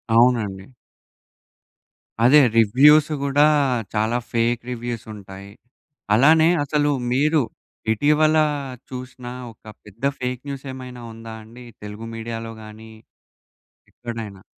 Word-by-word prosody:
అవునండి. 115 -4 +2 1.5
అదే 135 +5 +7 0.2
రివ్యూస్ 140 +8 +6
గూడా 140 +1 +3 0.5
చాలా 110 +2 +1
ఫేక్ 115 0 +1
రివ్యూస్ 120 -2 -5
ఉంటాయి. 100 0 -11 0.6
అలానే 160 +7 +5
అసలు 145 +1 +1 0.2
మీరు, 150 +4 +3 0.5
ఇటీవలా 155 +5 +3 0.4
చూసిన 125 -1 -8 0.2
ఒక 110 - -24 0.2
పెద్ద 105 +4 -17 0.2
ఫేక్ 125 -1 -3
న్యూస్ 140 0 -7
ఏమైనా 125 -2 -9
ఉందా 115 0 -9
అండి 120 +3 -13 0.2
తెలుగు 105 +2 -8
మీడియాలో 115 0 -6
గానీ... 110 +1 -12 1.0
…ఎక్కడైనా? 110 -5 -8
120 Hz, 100 wpm, -22 LUFS, 110-140 Hz, 1.5 s, అదే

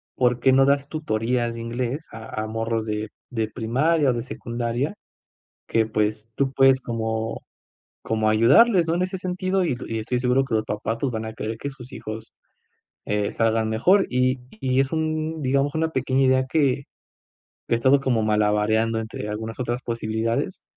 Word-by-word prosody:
¿por 125 -1 +2
qué 130 +1 +5
no 135 +1 +6
das 140 0 +2
tutorías 120 -5 -1
de 115 - -6
inglés 125 +6 -3
a 110 -1 -6
a - - -4
morros 115 0 -2
de 105 0 -3 0.2
de 110 -3 -1
primaria 135 +7 +1
o - - 0
de 120 - -2
secundaria, 120 +4 -3 0.8
que, 115 -1 +2
pues, 110 0 -1
tú 135 -1 +1
puedes 135 0 +5
como 110 -2 -3 0.6
como 110 -1 +1
ayudarles, 155 - +5
¿no?, 165 - +2
en 180 - +1
ese 185 +1 -2
sentido?". 185 +1 -1
Y 165 - +1
est 120 - -10
y 115 - -2
estoy 120 +3 -1
seguro 125 +2 +2
que 130 - -3
los 110 0 +1
papás 110 +2 -3
van 110 -1 -4
a 110 - -6
querer 110 0 -4
que 140 - -4
sus 130 -2 -13
hijos, 110 +1 -7 0.7
eh, 105 -1 -1
salgan 115 -1 +1
mejor, 180 - +4
y 130 +1 +1 0.2
y 130 0 +1
es 135 - -2
un 155 0 -1
digamos, 140 +2 +1
una 160 0 +1
pequeña 130 -1 +1
idea 130 0 +3
que 140 -2 +1 0.9
he - - +3
estado 130 +4 +4
como 125 -5 +1
malabareando, 110 +1 +2
entre 110 -1 -6
algunas 110 +1 -5
otras 120 0 -2
posibilidades, 115 -1 -2
120 Hz, 175 wpm, -24 LUFS, 110-135 Hz, 0.9 s, no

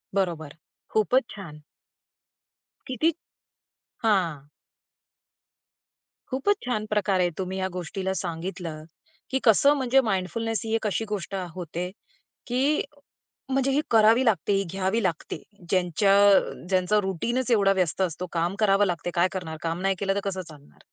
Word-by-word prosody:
बरोबर. 165 -6 -2 0.3
खूपच 235 +5 +3
छान! 160 -7 -10 1.3
किती, 260 +6 +1 0.9
हां. 170 -10 +1 1.8
खूपच 270 +10 +1
छान 215 -4 -1
प्रकारे 195 -4 +2
तुम्ही 190 0 -3
या 190 - 0
गोष्टीला 185 +2 -3
सांगितलं 170 -3 -5 0.5
की 265 - +1
कसं 260 +6 +6
म्हणजे 265 0 +3
माइंडफुलनेस 225 +1 -1
ही 220 - -2
एक 220 -1 0
अशी 215 +3 -1
गोष्ट 200 -2 -4
अ, 185 -1 -3
होते 175 0 -4 0.6
की 270 +5 +1 0.7
म्हणजे 270 0 +1
ही 275 +2 +2
करावी 225 +3 +5
लागते, 215 -3 +2
ही 195 0 +2
घ्यावी 195 +4 0
लागते. 175 -5 -3 0.3
ज्यांच्या 185 +2 +3 0.5
ज्यांचा 185 +2 +2
रुटीनच 235 +7 -1
एवढा 200 -4 +4
व्यस्त 185 -1 0
असतो, 180 0 -2
काम 170 +2 0
करावे 205 -1 +4
लागते, 175 -1 -2
काय 175 +1 +3
करणार? 165 -4 -5
काम 165 +1 -2
नाही 195 0 +2
केलं 195 -1 0
तर 200 - 0
कसं 190 -2 -2
चालणार? 150 -2 -16
195 Hz, 135 wpm, -26 LUFS, 180-225 Hz, 1.8 s, कसं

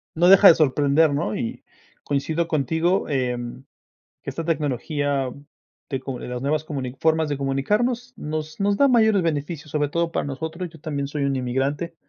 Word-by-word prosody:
No 175 +2 +4
deja 195 +1 +9
de 165 - +9
sorprender, 145 +1 +3
¿no? 140 -7 -1
Y, 115 - -4 0.4
coincido 155 +4 -1
contigo, 160 +5 0
em, 125 -2 -2 0.6
que - - -5
esta 165 - -5
tecnología 145 -3 -1 0.6
de 135 -2 -2
comu 130 -2 -6
de - - -7
las 125 0 -4
nuevas 150 +3 0
comuni 135 -5 -5
formas 160 -1 +2
de 145 - -2
comunicarnos 215 - -1
nos 155 +2 -5
nos 200 0 +2
da 280 - +5
mayores 220 -6 +4
beneficios, 155 0 -3
sobre 150 -1 0
todo 170 +2 -1
para - - -1
nosotros. 160 +6 -5
Yo 165 -1 -15
también 140 -2 -3
soy 145 0 -3
un 140 -1 0
inmigrante 135 +7 -2
150 Hz, 175 wpm, -23 LUFS, 135-165 Hz, 0.6 s, deja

